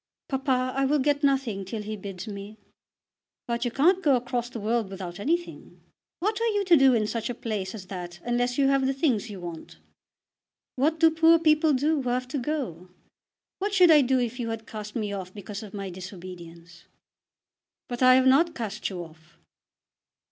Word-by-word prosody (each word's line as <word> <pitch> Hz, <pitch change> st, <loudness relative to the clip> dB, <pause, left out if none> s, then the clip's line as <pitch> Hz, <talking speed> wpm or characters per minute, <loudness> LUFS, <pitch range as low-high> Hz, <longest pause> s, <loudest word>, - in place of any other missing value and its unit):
"Papa, 260 Hz, -2 st, 0 dB
I 270 Hz, 0 st, +2 dB
will 295 Hz, +3 st, +2 dB
get 290 Hz, +1 st, +1 dB
nothing 265 Hz, -8 st, +1 dB
till 210 Hz, +3 st, -5 dB
he 215 Hz, +1 st, -5 dB
bids 195 Hz, -3 st, -7 dB
me." 205 Hz, +1 st, -8 dB, 0.9 s
"But 235 Hz, +1 st, -2 dB
you -, -, +1 dB
can't 340 Hz, +10 st, +3 dB
go 285 Hz, -7 st, +4 dB
across 245 Hz, -1 st, -2 dB
the 240 Hz, -, -7 dB
world 220 Hz, 0 st, -1 dB
without 185 Hz, -2 st, -7 dB
anything. 340 Hz, +10 st, -3 dB, 0.4 s
What 420 Hz, +5 st, -1 dB
are 465 Hz, -, +2 dB
you 410 Hz, -3 st, 0 dB
to 355 Hz, -2 st, +6 dB
do 270 Hz, -4 st, +5 dB
in 215 Hz, -2 st, +1 dB
such 225 Hz, +1 st, -3 dB
a 245 Hz, -, -3 dB
place 210 Hz, -4 st, -4 dB
as 195 Hz, -4 st, -8 dB
that 175 Hz, -2 st, -7 dB
unless 245 Hz, +1 st, 0 dB
you 275 Hz, -1 st, +4 dB
have 275 Hz, -1 st, +2 dB
the 270 Hz, -, 0 dB
things 250 Hz, -6 st, 0 dB
you 200 Hz, -2 st, -8 dB
want?" 170 Hz, -2 st, -8 dB, 1.0 s
"What 310 Hz, +5 st, +1 dB
do 325 Hz, 0 st, +6 dB
poor 325 Hz, +1 st, +5 dB
people 310 Hz, -1 st, +3 dB
do 295 Hz, +3 st, +1 dB
who 250 Hz, -, -2 dB
have 250 Hz, +1 st, -1 dB
to 280 Hz, -, -2 dB
go? 240 Hz, -, -4 dB, 0.7 s
What 405 Hz, +1 st, -1 dB
should 360 Hz, -3 st, +7 dB
I 300 Hz, -2 st, +7 dB
do 260 Hz, 0 st, +2 dB
if 245 Hz, +1 st, -2 dB
you 230 Hz, -2 st, -2 dB
had 225 Hz, 0 st, -5 dB
cast 210 Hz, -2 st, -8 dB
me 210 Hz, -3 st, -2 dB
off 185 Hz, -1 st, -6 dB
because 205 Hz, 0 st, -7 dB
of 210 Hz, -3 st, -10 dB
my 195 Hz, -2 st, -5 dB
disobedience?" 175 Hz, -2 st, -11 dB, 1.0 s
"But 245 Hz, 0 st, -5 dB
I 255 Hz, 0 st, +7 dB
have 260 Hz, 0 st, +4 dB
not 320 Hz, +6 st, +4 dB
cast 215 Hz, -3 st, -4 dB
you 180 Hz, -3 st, -5 dB
off." 160 Hz, -1 st, -17 dB
245 Hz, 195 wpm, -26 LUFS, 200-280 Hz, 1.0 s, should